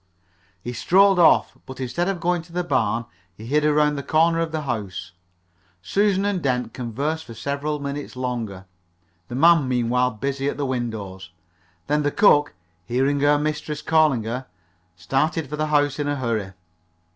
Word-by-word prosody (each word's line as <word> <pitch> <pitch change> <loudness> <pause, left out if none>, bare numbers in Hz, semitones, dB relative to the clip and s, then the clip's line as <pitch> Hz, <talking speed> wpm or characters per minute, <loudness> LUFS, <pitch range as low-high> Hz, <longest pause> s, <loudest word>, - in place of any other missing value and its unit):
He 120 - -5
strolled 190 - +4
off, 170 - +4
but 130 0 -9
instead 130 +8 -2
of 195 -3 -2
going 175 0 0
to 170 +1 -18
the 180 +1 -1
barn 120 -7 0 0.3
he 110 - -11
hid 150 +5 +1
around 150 -1 +3
the - - -2
corner 165 +4 +2
of 165 -1 -1
the 155 -1 -3
house. 100 - -4 0.7
Susan 200 - +1
and 200 -3 0
Dent 125 -4 -1
conversed 140 +7 -3
for 115 - -10
several 140 +5 -3
minutes 140 -1 -6
longer, 115 -7 -4 0.6
the 120 - -6
man 165 0 +5
meanwhile 125 0 +1
busy 135 +4 -2
at - - -5
the 145 - -1
windows. 110 -7 -4 0.6
Then 150 +1 +1
the 145 - +1
cook, 145 - +4 0.3
hearing 135 +4 +1
her 145 +1 +4
mistress 150 0 -3
calling 155 -7 +3
her, 125 +4 -4 0.5
started 135 - -1
for 150 - -5
the 155 +1 -1
house 145 -1 +1
in 145 - -1
a 145 - 0
hurry. 115 -7 -2
140 Hz, 170 wpm, -23 LUFS, 120-155 Hz, 0.7 s, man